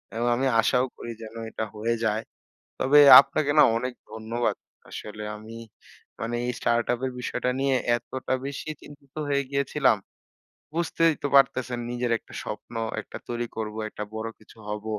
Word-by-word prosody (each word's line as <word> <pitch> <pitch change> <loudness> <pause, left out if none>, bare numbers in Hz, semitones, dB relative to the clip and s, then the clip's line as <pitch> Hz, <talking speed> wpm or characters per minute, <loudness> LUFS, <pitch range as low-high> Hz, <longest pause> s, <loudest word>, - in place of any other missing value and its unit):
এবং 120 +1 0
আমি 135 +2 +1
আশাও 125 +2 +2
করি 120 - -6
যেন 110 +1 -10 0.2
এটা 110 - -3
হয়ে 115 +2 0
যায়। 110 +1 0 0.6
তবে 145 +3 +5 0.2
আপনাকে 140 +1 -1
না - - +10
অনেক 125 +1 -2 0.2
ধন্যবাদ। 115 +2 -2 0.3
আসলে 105 0 -7
আমি 110 +2 -10 0.6
মানে 120 +1 -2
এই 125 - 0
স্টার্টআপের 120 +2 0
বিষয়টা 125 - -1
নিয়ে 135 -1 +2 0.2
এতটা 130 +2 -4
বেশি 140 +2 -6
চিন্তিত 140 -2 -15
হয়ে 140 0 +2
গিয়েছিলাম। 140 -3 +2 0.8
বুঝতেই 165 -1 +2
তো - - +1
পারতেছেন 130 -2 +3
নিজের 120 0 -2
একটা - - -16
স্বপ্ন, - - -7 0.3
একটা - - -10
তৈরি 120 0 -2
করব, 110 -1 -4
একটা 105 - -6
বড় 110 +1 -3
কিছু 110 - -19
হব। 105 0 -4
120 Hz, 150 wpm, -26 LUFS, 110-135 Hz, 0.8 s, না